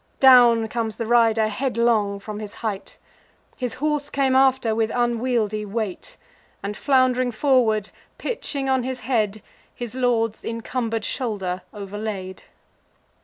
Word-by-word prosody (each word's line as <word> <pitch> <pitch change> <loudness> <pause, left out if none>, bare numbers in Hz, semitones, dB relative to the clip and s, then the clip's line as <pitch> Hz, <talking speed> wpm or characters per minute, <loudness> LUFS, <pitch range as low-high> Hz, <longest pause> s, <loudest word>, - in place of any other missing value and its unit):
Down 240 -4 +7
comes 225 -1 -3
the 230 - -3
rider 225 -1 +3
headlong 225 -3 +1
from 210 +1 -7
his 210 -1 -8
height: 205 -3 -4 0.6
His 250 -3 -3
horse 295 0 -1
came 270 -2 +1
after 260 -4 +3
with 220 0 0
unwieldy 235 -3 0
weight, 210 -2 -5 0.5
And, 205 +1 -4
flound'ring 255 -2 +2
forward, 220 -4 +2 0.3
pitching 285 - -3
on 265 -1 +2
his 255 0 -4
head, 215 -4 -1 0.3
His 240 -2 -6
lord's 235 -4 0
encumber'd 230 -1 -3
shoulder 195 -7 -2
overlaid. 200 -2 -6
230 Hz, 120 wpm, -23 LUFS, 215-255 Hz, 0.6 s, Down